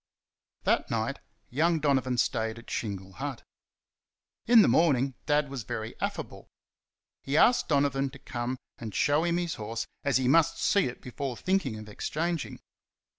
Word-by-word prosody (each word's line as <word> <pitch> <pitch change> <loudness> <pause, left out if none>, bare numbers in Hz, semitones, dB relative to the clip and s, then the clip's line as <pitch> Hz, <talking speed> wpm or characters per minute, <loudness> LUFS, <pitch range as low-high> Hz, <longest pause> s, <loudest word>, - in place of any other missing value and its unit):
That - - +1
night, - - -1 0.3
young 160 +5 +2
Donovan 130 -4 +1
stayed 110 -1 0
at 115 - -11
Shingle 95 -3 -4
Hut. 135 +4 -5 1.0
In 230 -2 +8
the - - +4
morning 135 -5 +3
Dad 150 -1 +3
was 135 -2 -5
very 110 +1 -5
affable. - - -4 0.7
He 140 +2 -1
asked 245 +8 +5
Donovan 140 -2 +2
to 140 - -12
come 125 0 -4 0.2
and 110 -3 -6
show 150 +2 +3
him 170 0 +1
his 175 -3 -1
horse, 115 +2 -3 0.2
as 140 -2 +3
he 130 -1 0
must 165 +4 +4
see 200 - +3
it 125 - -7
before 125 0 -4
thinking 185 - 0
of 110 0 -9
exchanging. 160 +9 -3
135 Hz, 155 wpm, -29 LUFS, 120-155 Hz, 1.0 s, In